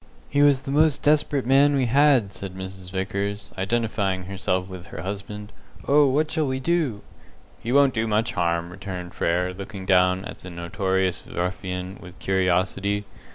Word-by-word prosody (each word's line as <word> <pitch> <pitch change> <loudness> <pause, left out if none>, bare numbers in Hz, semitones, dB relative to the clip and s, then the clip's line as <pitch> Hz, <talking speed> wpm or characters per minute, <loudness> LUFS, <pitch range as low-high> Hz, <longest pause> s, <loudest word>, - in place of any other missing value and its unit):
"He 145 - +3
was 140 -2 +4
the 135 - -4
most 150 0 +3
desperate 145 -3 +2
man 140 +3 +5
we 135 -2 +2
had," 130 -4 +4
said 95 -2 -7
Mrs. 95 0 -8
Vickers, 100 +2 -3
identifying 100 -2 -1
herself 95 -1 -2
with 90 -2 -9
her 80 - -7
husband. 105 +2 -6 0.4
"Oh, 145 0 +5
what 150 +4 +1
shall 155 -2 0
we 130 0 -1
do?" 145 -8 0 0.6
"He 115 - -4
won't 140 -1 +5
do 115 0 0
much 110 +2 +1
harm," 85 0 0
returned 90 -2 -7
Frere, 90 +2 0
looking 100 0 -8
down 90 0 +3
at - - -8
the 90 - -9
notorious 95 +1 -1
ruffian 90 +1 -4
with 90 -2 -12
curiosity. 95 +2 0
100 Hz, 160 wpm, -24 LUFS, 95-130 Hz, 0.6 s, man